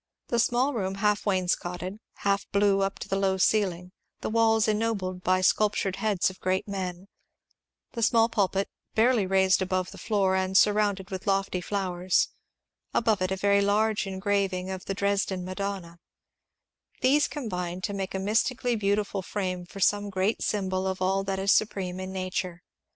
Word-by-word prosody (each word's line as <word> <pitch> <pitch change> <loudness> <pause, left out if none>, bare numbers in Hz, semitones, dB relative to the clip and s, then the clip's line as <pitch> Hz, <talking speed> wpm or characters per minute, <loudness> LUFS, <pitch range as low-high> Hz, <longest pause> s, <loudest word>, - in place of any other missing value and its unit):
The 235 - +1
small 245 +5 +2
room 195 -5 -2
half 210 +1 +1
wainscotted, 185 0 -1 0.2
half 200 0 0
blue 200 -1 +3
up 195 0 -1
to - - -7
the 195 - -1
low 190 -1 +1
ceiling; 180 -3 +1 0.3
the - - -3
walls 225 -1 +3
ennobled 210 -4 -1
by 185 +1 +2
sculptured 195 0 +2
heads 200 -3 +1
of 185 - -16
great 185 +2 -1
men; 190 -2 -5 0.8
the 235 - -5
small 225 +1 +4
pulpit 195 -3 0 0.3
barely 225 -3 +3
raised 190 0 +3
above 185 -1 -1
the - - -11
floor 195 -3 +1
and 190 0 +1
surrounded 205 -2 +2
with 190 0 -6
lofty 195 -2 0
flowers, 185 -2 0 0.3
— - - -49
above 220 -4 +2
it 185 - +1
a 190 - 0
very 200 +1 +3
large 210 +1 +1
engraving 190 -1 -1
of 190 -1 -6
the 195 - -3
Dresden 200 -2 0
Ma 185 - -5
donna: 190 -4 -5 1.0
these 285 +3 +4
combined 180 - -4
to 205 - -2
make 195 -1 -4
a - - -1
mystically 235 +4 +1
beautiful 205 -1 0
frame 185 -2 -4
for 195 - -10
some 205 +1 +2
great 190 +3 0
symbol 190 -2 -1
of 190 0 -2
all 190 +1 +1
that 195 0 -2
is 195 +1 +2
supreme 185 -4 0
in 185 0 -5
nature. 185 -1 -4
195 Hz, 170 wpm, -27 LUFS, 185-210 Hz, 1.0 s, small